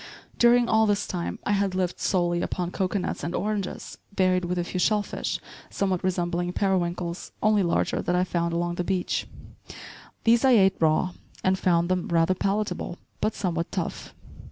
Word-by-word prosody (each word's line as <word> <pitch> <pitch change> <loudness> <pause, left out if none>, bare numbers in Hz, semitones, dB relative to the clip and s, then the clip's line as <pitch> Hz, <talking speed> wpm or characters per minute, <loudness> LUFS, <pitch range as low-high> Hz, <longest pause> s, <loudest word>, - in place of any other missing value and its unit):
During 240 0 +5
all 220 -1 +4
this 205 0 +1
time 175 -2 -3
I - - +1
had 200 -2 +1
lived 180 -1 -1
solely 175 -2 +1
upon 180 -1 -2
cocoanuts 190 0 -2
and 170 - -2
oranges, 205 -2 -3 0.2
varied 185 -1 +3
with 180 +1 -2
a 175 - +1
few 180 +1 -4
shellfish, 210 +2 0 0.3
somewhat 190 -2 -1
resembling 175 -1 -1
periwinkles, 175 -3 -1
only 215 -1 +4
larger, 170 -2 +1
that 175 - 0
I 180 - +3
found 170 -2 -1
along 175 +1 -1
the 180 - 0
beach. 185 0 -1 1.0
These 230 0 +4
I 265 -1 +6
ate 195 -4 +5
raw, 160 +3 +2 0.3
and 185 0 +3
found 170 -2 +2
them 180 -1 0
rather 170 +2 +3
palatable 195 -2 -2 0.2
but 215 - 0
somewhat 170 -3 -2
tough. - - -4
185 Hz, 165 wpm, -26 LUFS, 175-200 Hz, 1.0 s, I